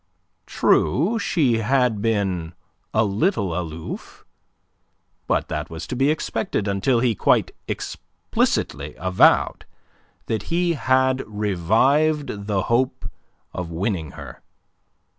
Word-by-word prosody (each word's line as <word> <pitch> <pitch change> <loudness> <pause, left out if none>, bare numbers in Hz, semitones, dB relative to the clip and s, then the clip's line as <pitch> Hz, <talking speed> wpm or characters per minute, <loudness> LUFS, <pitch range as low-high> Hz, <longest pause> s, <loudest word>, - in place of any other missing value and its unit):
True, 165 - +2
she 135 - +1
had 120 -2 +1
been 95 -7 -1 0.4
a 110 +1 +2
little 100 - 0
aloof. 80 -2 -6 1.0
But - - +1
that - - -3
was 80 -1 -7
to - - -5
be 135 +3 +2
expected 110 -8 -1
until 110 +5 +1
he 120 -2 +2
quite - - +2 0.2
explicitly - - -2
avowed 90 +1 +3 0.6
that 110 -3 -2
he 170 0 +1
had 130 -2 +2
revived 105 - +1
the 100 -3 0
hope 125 +2 0 0.4
of 90 -2 -4
winning 85 -3 -2
her. - - -10
110 Hz, 105 wpm, -22 LUFS, 95-130 Hz, 1.0 s, avowed